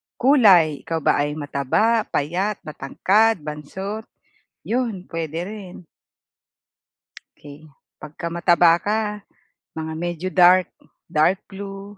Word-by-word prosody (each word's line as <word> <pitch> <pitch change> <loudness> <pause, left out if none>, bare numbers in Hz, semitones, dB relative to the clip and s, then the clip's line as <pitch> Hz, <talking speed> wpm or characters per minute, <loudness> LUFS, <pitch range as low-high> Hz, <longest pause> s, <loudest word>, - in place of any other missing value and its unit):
kulay 195 - +5
ikaw 165 -2 -2
ba - - +2
ay 145 +1 -1
mataba, 155 - 0
payat, 185 +8 -1
matangkad, 185 +7 +1
bansot 190 +9 -6 0.6
yun 225 -6 -2
puwede 165 -1 -4
rin. 205 -4 -9 1.6
'Key, 150 +2 -14 0.3
pagka 165 +3 -7
mataba 170 -1 +4
ka 215 +2 0 0.7
mga 160 0 -5
medyo 175 +1 -4
dark. 180 0 +5 0.4
Dark 175 +5 +2
blue 200 0 -9
175 Hz, 100 wpm, -22 LUFS, 155-205 Hz, 1.6 s, kulay